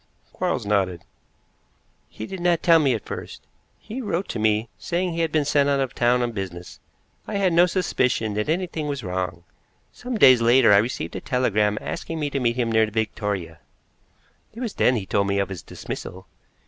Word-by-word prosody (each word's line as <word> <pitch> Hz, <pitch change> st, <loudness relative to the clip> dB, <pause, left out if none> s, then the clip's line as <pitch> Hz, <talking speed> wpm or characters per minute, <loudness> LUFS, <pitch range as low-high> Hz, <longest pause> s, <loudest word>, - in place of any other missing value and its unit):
Quarles -, -, -2 dB
nodded. 95 Hz, -4 st, 0 dB, 1.0 s
"He 110 Hz, -, -7 dB
did 190 Hz, +10 st, -7 dB
not 175 Hz, -1 st, +1 dB
tell 165 Hz, -1 st, +6 dB
me 135 Hz, -5 st, +2 dB
at 110 Hz, -, -7 dB
first. -, -, -7 dB, 0.3 s
He 245 Hz, +5 st, -7 dB
wrote 195 Hz, -5 st, -2 dB
to 115 Hz, -, -3 dB
me, 110 Hz, +1 st, +1 dB
saying 175 Hz, +9 st, -2 dB
he 165 Hz, -, -4 dB
had 165 Hz, -2 st, 0 dB
been 150 Hz, -2 st, +1 dB
sent 145 Hz, -1 st, +2 dB
out 140 Hz, -1 st, +2 dB
of 135 Hz, -2 st, -1 dB
town 125 Hz, +1 st, +2 dB
on 120 Hz, -, -1 dB
business. 95 Hz, -4 st, -7 dB, 0.5 s
I 215 Hz, -, -4 dB
had 190 Hz, -3 st, +2 dB
no 175 Hz, +2 st, +5 dB
suspicion 130 Hz, -, 0 dB
that 105 Hz, +4 st, -2 dB
anything 165 Hz, -2 st, -2 dB
was 140 Hz, -4 st, -3 dB
wrong. 90 Hz, -2 st, -3 dB, 0.5 s
Some 250 Hz, -1 st, -5 dB
days 130 Hz, -, +7 dB
later 115 Hz, -1 st, +5 dB
I -, -, +7 dB
received 115 Hz, +6 st, -1 dB
a -, -, -4 dB
telegram 105 Hz, -5 st, +1 dB
asking 165 Hz, -1 st, -5 dB
me 145 Hz, -2 st, -2 dB
to 140 Hz, -, -1 dB
meet 120 Hz, -2 st, +1 dB
him 120 Hz, -2 st, 0 dB
near 110 Hz, -1 st, +3 dB
Victoria. 105 Hz, -6 st, -3 dB, 1.0 s
It -, -, -8 dB
was 240 Hz, -5 st, -3 dB
then 125 Hz, -, +3 dB
he 105 Hz, -5 st, -3 dB
told 100 Hz, +1 st, 0 dB
me 100 Hz, 0 st, 0 dB
of 100 Hz, 0 st, 0 dB
his 95 Hz, -3 st, -6 dB
dismissal. 95 Hz, +1 st, -8 dB
120 Hz, 195 wpm, -23 LUFS, 105-165 Hz, 1.0 s, days